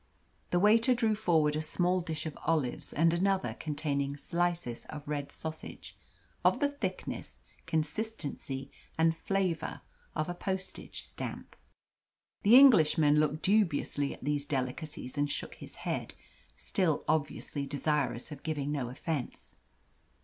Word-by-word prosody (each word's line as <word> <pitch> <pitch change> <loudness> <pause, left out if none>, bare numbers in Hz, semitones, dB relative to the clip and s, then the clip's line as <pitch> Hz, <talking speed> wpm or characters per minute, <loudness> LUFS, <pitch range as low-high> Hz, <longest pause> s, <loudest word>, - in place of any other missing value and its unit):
The 175 - +2
waiter 225 +6 +5
drew 225 -3 +2
forward 160 -8 +2
a 155 - 0
small 180 +3 +1
dish 160 -3 -4
of 155 - -4
olives 150 -7 0
and 165 +2 +3
another 190 +2 +1
containing 145 -2 -1
slices 170 -6 -1
of 150 -1 -8
red 145 -1 -3
sausage 160 0 -7 0.5
of - - +4
the 285 - +3
thickness, 285 0 -5 0.3
consistency, 150 -5 -3 0.3
and 160 0 +4
flavour 185 -1 -1 0.3
of 155 - 0
a 175 - -2
postage 190 +1 -4
stamp. - - -7 0.9
The 215 +4 +7
Englishman 160 - +7
looked 155 +1 +1
dubiously 165 -8 +2
at - - -10
these 145 0 -1
delicacies 135 +1 -3
and 145 0 +2
shook - - -4
his - - -10
head - - -2 0.4
still 165 - 0
obviously 145 -2 -1
desirous 145 -2 -1
of 145 - -8
giving 145 -3 -2
no 135 -5 -1
offence. 140 +1 -4
155 Hz, 130 wpm, -31 LUFS, 145-180 Hz, 0.9 s, The